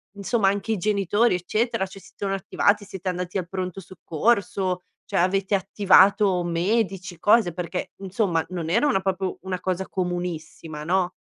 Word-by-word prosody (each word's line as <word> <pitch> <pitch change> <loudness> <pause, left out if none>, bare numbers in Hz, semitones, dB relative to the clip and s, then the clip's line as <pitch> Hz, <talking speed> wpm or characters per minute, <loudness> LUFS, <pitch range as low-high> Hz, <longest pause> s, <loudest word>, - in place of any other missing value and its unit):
insomma 200 0 +1
anche 200 +3 -1
i - - -1
genitori 205 +2 +2
eccetera, 205 +3 -1
ci 195 - -13
si - - -17
sono 195 -1 -2
attivati, 200 +2 +1
siete 190 -1 -8
andati 180 +1 -2
al 175 -2 -3
pronto 185 0 -4
soccorso, 185 +1 -1 0.2
cioè - - 0
avete 195 +2 +1
attivato 195 -1 +4
medici, 185 +1 -1
cose, 210 -5 +4
perché 175 +1 -4
insomma, 190 -4 0
non 170 -3 -4
era 235 - +3
una 195 - +2
proprio 190 -1 -2
una 185 -1 -4
cosa 185 0 -2
comunissima, 175 -4 -4
no? 180 +2 +1
190 Hz, 155 wpm, -24 LUFS, 180-200 Hz, 0.2 s, attivato